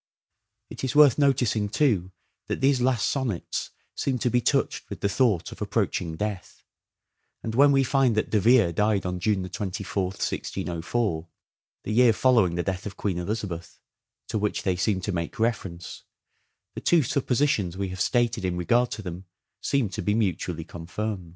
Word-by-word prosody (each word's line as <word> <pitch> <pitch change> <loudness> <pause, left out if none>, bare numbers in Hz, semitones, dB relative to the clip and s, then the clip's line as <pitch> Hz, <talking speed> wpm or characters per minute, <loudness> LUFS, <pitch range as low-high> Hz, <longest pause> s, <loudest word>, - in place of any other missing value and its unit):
It - - -8
is 130 - -2
worth 150 -3 +7
noticing, 125 -7 +2
too, 105 - +1 0.4
that - - -2
these 135 -1 +3
last 125 -5 +2
sonnets 125 -10 -2 0.2
seem 130 -2 -1
to 120 - 0
be 125 - +3
touched - - 0
with - - -7
the 100 - +2
thought 100 -4 +1
of - - -11
approaching 80 -2 -1
death; 105 0 -5 0.8
and 110 - -3
when 140 +4 +6
we 135 -1 +4
find 130 -3 +2
that 110 - 0
De 110 - +3
Vere 115 -3 +5
died 105 +2 +1
on 90 0 -2
June 95 -1 0
24th, 95 0 -3
1604, 85 0 -2 0.6
the - - -4
year 120 0 +5
following 115 -8 +3
the 85 - -1
death 95 +2 -3
of 100 - -9
Queen 95 -4 -1
Elizabeth, 90 -3 -5 0.5
to 110 - -2
which 105 0 -1
they 95 -2 +1
seem 95 +1 0
to 100 - -2
make 85 -2 -3
reference, 95 -6 -3 0.7
the - - -7
two 170 -3 +4
suppositions 125 - 0
we 100 -1 -2
have 95 0 -5
stated 120 -1 +1
in 90 -1 -1
regard 120 +8 +2
to 105 - -6
them 90 0 -7 0.4
seem 140 -5 +1
to 95 - -5
be 105 - +1
mutually 90 -6 -1
confirmed. 90 +3 -5
105 Hz, 170 wpm, -26 LUFS, 90-120 Hz, 0.8 s, worth